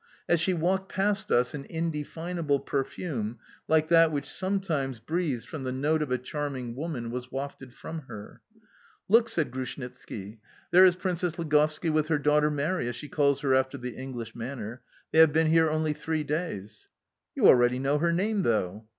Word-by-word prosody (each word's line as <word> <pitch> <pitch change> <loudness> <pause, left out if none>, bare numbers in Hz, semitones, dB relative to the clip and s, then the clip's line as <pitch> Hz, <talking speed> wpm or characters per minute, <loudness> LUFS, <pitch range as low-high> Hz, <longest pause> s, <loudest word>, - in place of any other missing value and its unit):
As 170 - +3
she 180 +2 +2
walked 190 +4 0
past 195 +1 0
us 125 0 +3
an 140 -2 -6
indefinable 165 -1 -2
perfume, 135 -5 -3 0.3
like 155 0 +3
that 165 -1 +6
which 145 -1 -3
sometimes 165 - -2
breathes 155 -3 -2
from 155 -5 -7
the 130 - -2
note 150 +5 +1
of 150 - -2
a 125 - +2
charming 130 -2 -4
woman, 135 -6 -4
was 125 +1 -6
wafted 135 -1 -6
from 160 +6 -7
her. 105 -1 -10 0.7
"Look!" 230 +3 +5
said 155 -7 -1
Grushnitski, 125 -5 -7 0.3
"there 185 +1 +8
is 180 - +3
Princess 180 -2 -2
Ligovski 155 0 +1
with 155 -1 +1
her 160 -1 +2
daughter 150 +1 +3
Mary, 150 -1 -1
as 120 - -3
she 145 - -8
calls 140 -1 +2
her 135 -2 +2
after 130 +1 +1
the 125 -1 -6
English 130 -3 -6
manner. 120 -1 -6 0.3
They 160 - +3
have 160 -2 +7
been 160 +1 +3
here 160 -1 +5
only 155 0 0
three 155 0 -2
days." 145 - -4 0.5
"You - - +2
already 120 0 +6
know 140 +3 +1
her 170 +2 +2
name, 200 +4 +1
though?" 105 - -1
150 Hz, 175 wpm, -28 LUFS, 130-165 Hz, 0.7 s, there